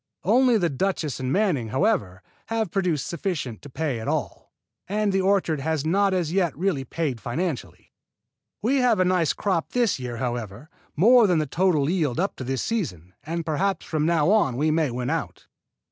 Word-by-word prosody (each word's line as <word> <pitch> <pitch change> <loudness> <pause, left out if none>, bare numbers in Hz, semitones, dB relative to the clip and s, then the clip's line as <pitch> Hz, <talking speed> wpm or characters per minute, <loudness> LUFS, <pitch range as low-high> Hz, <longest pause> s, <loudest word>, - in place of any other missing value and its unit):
Only 245 +4 +4
the 175 -5 +1
Duchess 155 -3 -2
and 130 0 -2
Manning, 180 - +1
however, 130 - 0 0.2
have 225 -5 -1
produced 175 -8 0
sufficient 160 - -4
to 145 - -11
pay 140 -3 -2
at 110 - -6
all, - - -3 0.4
and 205 +1 0
the 190 - +2
orchard 190 -5 +1
has 155 0 -1
not 195 +4 +2
as 175 -4 -1
yet 180 -6 +1
really 175 -6 0
paid 135 -5 -3
financially. 155 +2 -4 0.7
We 260 +5 +2
have 245 -6 +3
a 185 - +4
nice 180 -4 +2
crop 185 -5 -2
this 240 - +1
year, 125 -2 -5
however, 120 +2 -5 0.2
more 230 +7 +6
than 180 -3 +2
the 155 - +1
total 160 -2 +1
yield 160 -6 0
up 195 +3 0
to - - -5
this 130 0 -2
season, 95 - -3
and 165 +1 -4
perhaps 185 +4 -1
from 155 0 -1
now 165 0 +3
on 170 - +2
we 155 +3 +2
may 155 -2 +1
win 125 +1 -3
out. - - -4
165 Hz, 185 wpm, -24 LUFS, 135-195 Hz, 0.7 s, more